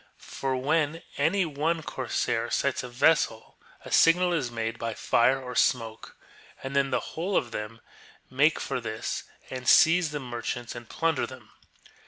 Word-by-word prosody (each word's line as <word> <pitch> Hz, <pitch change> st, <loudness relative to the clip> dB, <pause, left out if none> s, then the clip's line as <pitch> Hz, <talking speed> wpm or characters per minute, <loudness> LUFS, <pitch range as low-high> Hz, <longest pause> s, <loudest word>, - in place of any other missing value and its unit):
For 135 Hz, -1 st, -4 dB
when 155 Hz, +4 st, 0 dB, 0.2 s
any 185 Hz, +6 st, +2 dB
one 160 Hz, +2 st, -1 dB
cor -, -, -6 dB
sair -, -, 0 dB
sights -, -, 0 dB
a 125 Hz, -, -7 dB
vessel 120 Hz, -2 st, +1 dB, 0.3 s
a -, -, -9 dB
signal 175 Hz, +2 st, +5 dB
is 140 Hz, -7 st, -1 dB
made 115 Hz, 0 st, -4 dB
by 115 Hz, -1 st, -3 dB
fire 130 Hz, +3 st, +3 dB
or 125 Hz, -1 st, -7 dB
smoke, 115 Hz, -4 st, 0 dB, 0.5 s
and 135 Hz, +1 st, -5 dB
then 140 Hz, 0 st, +2 dB
the -, -, -2 dB
whole 185 Hz, +4 st, -1 dB
of 120 Hz, -, -1 dB
them 110 Hz, +1 st, -6 dB, 0.5 s
make 145 Hz, +5 st, +2 dB
for -, -, -3 dB
this, 110 Hz, -1 st, -4 dB, 0.3 s
and 125 Hz, -1 st, -2 dB
seize 170 Hz, 0 st, +6 dB
the 150 Hz, 0 st, -4 dB
mer 120 Hz, -3 st, -6 dB
chants 120 Hz, 0 st, -4 dB
and 120 Hz, -1 st, -10 dB
plunder 165 Hz, -4 st, 0 dB
them. 125 Hz, -5 st, -13 dB
135 Hz, 170 wpm, -27 LUFS, 120-160 Hz, 0.5 s, seize